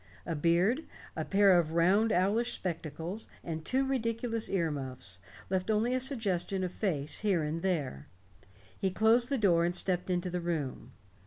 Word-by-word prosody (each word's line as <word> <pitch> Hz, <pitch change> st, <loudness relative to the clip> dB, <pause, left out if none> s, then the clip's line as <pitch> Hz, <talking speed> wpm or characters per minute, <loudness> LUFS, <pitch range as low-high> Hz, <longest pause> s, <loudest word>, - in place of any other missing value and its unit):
A 165 Hz, -, -2 dB
beard, 175 Hz, -, +2 dB, 0.3 s
a -, -, -2 dB
pair 195 Hz, -2 st, +5 dB
of 160 Hz, -2 st, -1 dB
round 195 Hz, +7 st, +3 dB
owlish 205 Hz, +7 st, +2 dB
spectacles, 170 Hz, +3 st, -4 dB, 0.2 s
and 160 Hz, -2 st, -4 dB
two 265 Hz, +9 st, +1 dB
ridiculous 230 Hz, -3 st, -1 dB
ear 170 Hz, -5 st, +1 dB
muffs, 130 Hz, -9 st, -4 dB, 0.3 s
left 190 Hz, +1 st, -1 dB
only 220 Hz, +3 st, +2 dB
a 255 Hz, -, +2 dB
suggestion 200 Hz, -8 st, -1 dB
of 180 Hz, -, -2 dB
face 155 Hz, -8 st, -1 dB
here 195 Hz, -6 st, +1 dB
and 155 Hz, +2 st, -2 dB
there. 150 Hz, -, -2 dB, 0.7 s
He 195 Hz, -, 0 dB
closed 225 Hz, +5 st, +3 dB
the 275 Hz, -, +1 dB
door 175 Hz, -7 st, +3 dB
and 175 Hz, +1 st, 0 dB
stepped 180 Hz, -1 st, 0 dB
into 180 Hz, 0 st, -1 dB
the 180 Hz, 0 st, -2 dB
room. 145 Hz, -7 st, -3 dB
185 Hz, 165 wpm, -31 LUFS, 165-220 Hz, 0.7 s, pair